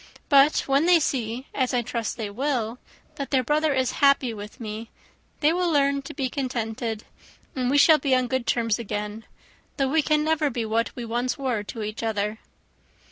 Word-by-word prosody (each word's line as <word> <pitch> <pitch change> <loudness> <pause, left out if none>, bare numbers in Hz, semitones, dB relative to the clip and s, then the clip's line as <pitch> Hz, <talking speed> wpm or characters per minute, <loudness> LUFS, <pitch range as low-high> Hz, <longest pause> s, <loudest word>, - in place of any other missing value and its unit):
But 280 0 +5
when 280 +4 +2
they 355 -1 +6
see, 250 -4 -2
as 255 -2 0
I 240 - +1
trust 230 +1 -3
they 215 -3 -4
will, 245 -1 -2 0.4
that 280 - -4
their 260 -2 +2
brother 300 +4 +1
is 260 -2 +1
happy 275 -4 +4
with 210 0 -9
me, 220 0 -6 0.5
they 305 +2 +4
will 355 0 +1
learn 280 -2 +2
to 275 - -9
be 270 -2 -1
contented, 230 -4 -3 0.5
and 250 -2 0
we 285 - +3
shall 310 +2 +7
be 270 -3 +2
on 255 0 +2
good 260 -1 -2
terms 230 -2 +1
again: 210 0 -5 0.5
though 270 -2 +1
we 315 +3 +3
can 300 0 +2
never 310 -1 +1
be 235 -3 -3
what 225 +1 0
we 240 - -5
once 240 +2 -1
were 255 -6 -1
to 220 +1 -6
each 215 +1 -5
other." 215 -1 -2
255 Hz, 190 wpm, -25 LUFS, 225-280 Hz, 0.5 s, shall